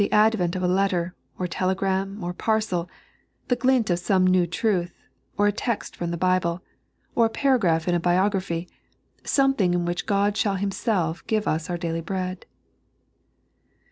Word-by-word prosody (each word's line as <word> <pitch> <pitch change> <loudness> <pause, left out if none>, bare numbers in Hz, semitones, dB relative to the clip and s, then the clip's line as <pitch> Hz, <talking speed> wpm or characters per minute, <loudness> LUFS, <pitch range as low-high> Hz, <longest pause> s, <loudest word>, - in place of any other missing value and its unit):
advent 210 -5 +3
of 185 - -2
a - - +2
letter, 180 -1 +1 0.2
or 180 - -2
tel^^ram, 190 +2 -1
or 175 0 -3
parcel, 210 -4 -1 0.6
the 245 - +3
glint 255 -3 +2
of 175 - +1
some 185 +1 +2
new 185 -1 +3
truth, 180 -1 -1 0.3
or 205 - +3
a 205 - +4
text 230 +2 -3
from 170 - -3
the 170 - -3
Bible, 185 -1 +1 0.5
or 230 -1 +4
a - - -6
paragraph 210 - +2
in 175 - +2
a 175 - +2
biography 180 -1 0 0.3
— - - -40
something 270 -10 +3
in 175 -1 0
which 175 0 -3
God 200 0 +2
shall 210 -2 +1
Himself 195 -3 -1
give 215 -1 0
us 160 +4 -1
our 175 - -1
daily 165 -1 -3
bread. 185 +1 -4
185 Hz, 165 wpm, -24 LUFS, 175-205 Hz, 0.6 s, a